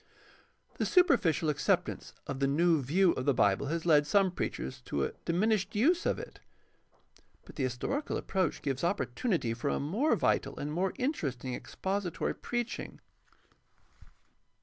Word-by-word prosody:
— - - -33
The - - +1
superficial 175 - +3
acceptance 180 +5 -1
of 135 - -4
the 135 - +2
new 160 +2 +3
view 170 +8 +3
of 130 - -3
the 140 - +3
Bible 100 +6 +2
has 165 +3 -2
led 150 -3 +5
some 195 +1 +3
preachers 65 - -4
to 70 - -1
a - - -1
diminished 200 +4 +1
use 330 - +3
of - - +1
it. - - -9 1.1
But - - -13
the - - -4
his 130 -2 -1
torical 280 - -2
approach 185 -6 -1
gives 135 0 -2
opportunity 165 - 0
for 115 - -2
a - - 0
more 210 - +1
vital - - 0
and 150 +1 -4
more 185 +3 0
interesting 135 - -2
expository 190 +5 -3
preaching. 240 -1 -4
170 Hz, 150 wpm, -31 LUFS, 140-200 Hz, 1.1 s, led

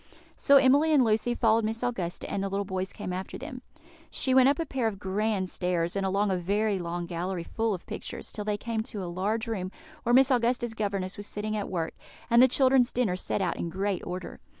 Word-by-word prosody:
So 280 - +5
Emily 275 +4 +5
and 270 - +6
Lucy 225 +2 +1
followed 225 -1 +3
Miss 225 +2 -2
Augusta, 190 -9 -3
and 200 - -2
the 195 - -2
little 200 +1 -1
boys 190 0 -3
came 195 -4 -5
after 185 +1 -5
them. - - -8 0.5
She 260 - +1
went 260 0 +7
up 285 - +2
a 330 - -1
pair 255 -6 -1
of 210 -3 -3
grand 195 0 -1
stairs, 175 -1 -1
and 195 - 0
along 195 +1 +1
a 185 - +1
very 200 +3 0
long 175 0 -3
gallery 175 +1 -3
full 225 +3 -1
of 180 - -11
pictures, - - -7
till 210 - -5
they 210 0 -1
came 230 0 -2
to 215 -3 -6
a - - -4
large 200 +6 -1
room, 190 -5 -3 0.3
where 240 - +1
Miss 265 +1 +6
Augusta's 240 -1 +1
governess 200 -3 -2
was 205 0 -6
sitting 215 +1 -3
at 205 -2 -3
work, 165 -3 -2 0.4
and 235 +1 +7
the 260 - +8
children's 260 -1 +4
dinner 230 -7 +1
set 190 +1 -2
out 180 - -1
in 170 - -3
great 190 +2 -2
order. 180 +1 -6
205 Hz, 225 wpm, -28 LUFS, 185-235 Hz, 0.5 s, the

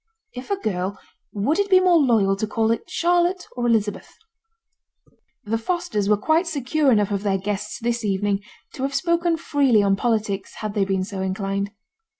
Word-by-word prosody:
If 250 +1 -8
a 400 - +2
girl, 195 - -3 0.3
would 225 - 0
it 405 0 +1
be 375 -1 +7
more 360 -2 +4
loyal 220 -8 +3
to 215 - -2
call 220 +1 +1
it 230 - -3
Charlotte 350 +1 +1
or 240 -1 -1
Elizabeth?' 215 -3 -1 1.3
The 225 +1 -1
Fosters 285 - -1
were 210 - +4
quite 320 - +1
secure 290 -1 +1
enough 210 -3 +2
of 200 -1 -1
their 200 -2 +1
guests 205 +3 -4
this 235 0 -1
evening 200 0 0 0.3
to - - -8
have 275 +1 -2
spoken 340 +2 +1
freely 275 -9 +2
on 195 -1 +3
politics 210 -3 -1
had 215 -1 -5
they 205 -2 +1
been 190 -1 0
so 190 0 -5
inclined. 195 +1 -2
220 Hz, 175 wpm, -23 LUFS, 200-305 Hz, 1.3 s, be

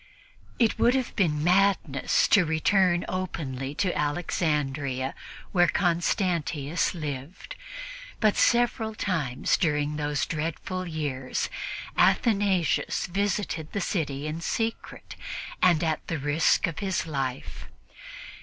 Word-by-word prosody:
It 230 -3 +2
would 245 +2 +4
have 260 -3 -2
been 150 -6 +1
madness 180 -6 +3
to 200 - +6
return 175 +2 +2
openly 145 -7 -4
to 185 0 0
Alexandria 145 -4 -1 0.4
while 175 -2 +4
Constantius 170 -3 0
lived, 150 0 -6 0.6
but 215 -2 +3
several 235 -2 +2
times 155 -12 0
during 150 -3 0
those 145 -1 -1
dreadful 170 +3 -3
years 145 -5 -3 0.4
Athanasius 195 - +2
visited 190 -4 -2
the 200 - -1
city 145 -7 -2
in 155 +2 -4
secret 225 +6 -3 0.5
and 175 -3 +4
at 160 -2 -1
the 165 - -2
risk 145 +3 +2
of 165 - -4
his 190 -2 -1
life. 135 -4 -4
165 Hz, 105 wpm, -27 LUFS, 145-185 Hz, 0.6 s, to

